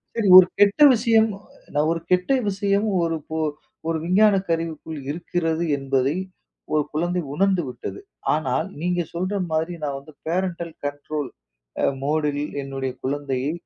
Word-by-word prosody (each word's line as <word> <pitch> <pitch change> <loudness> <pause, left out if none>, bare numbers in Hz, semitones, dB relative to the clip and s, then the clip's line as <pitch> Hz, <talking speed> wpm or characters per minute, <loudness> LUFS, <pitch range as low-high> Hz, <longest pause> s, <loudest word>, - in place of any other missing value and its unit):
சரி, 225 -3 +1
ஒரு 185 -1 +9
கெட்ட 205 +7 +4
விஷயம். 225 -1 +4 0.5
நான் 150 +2 +2
ஒரு 165 - -1
கெட்ட 180 +7 +2 0.2
விஷயம் 200 +2 +1
ஒரு 165 -1 0 0.2
ஒரு 155 -1 +1 0.4
ஒரு 165 -1 0
விஞ்ஞான 200 +3 +5
கருவிக்குள் 160 -1 -3
இருக்கிறது, 165 0 -1
என்பதை 135 +1 0 0.6
ஒரு 150 -1 +3
குழந்தை 175 +3 0
உணர்ந்து 190 +1 +2
விட்டது. 125 - -7 0.3
ஆனால் 150 +2 0
நீங்க 175 0 0
சொல்ற 185 +4 -2 0.2
மாதிரி 160 +2 0
நான் 140 -2 -2
வந்து 145 +2 -15
பேரண்டல் 170 -1 -2
கண்ட்ரோல் 145 0 -4 0.5
அ - - +5 0.2
மோட்யில் 150 0 0
என்னுடைய 135 -1 -4
குழந்தையை 140 0 -1
165 Hz, 135 wpm, -23 LUFS, 145-180 Hz, 0.6 s, ஒரு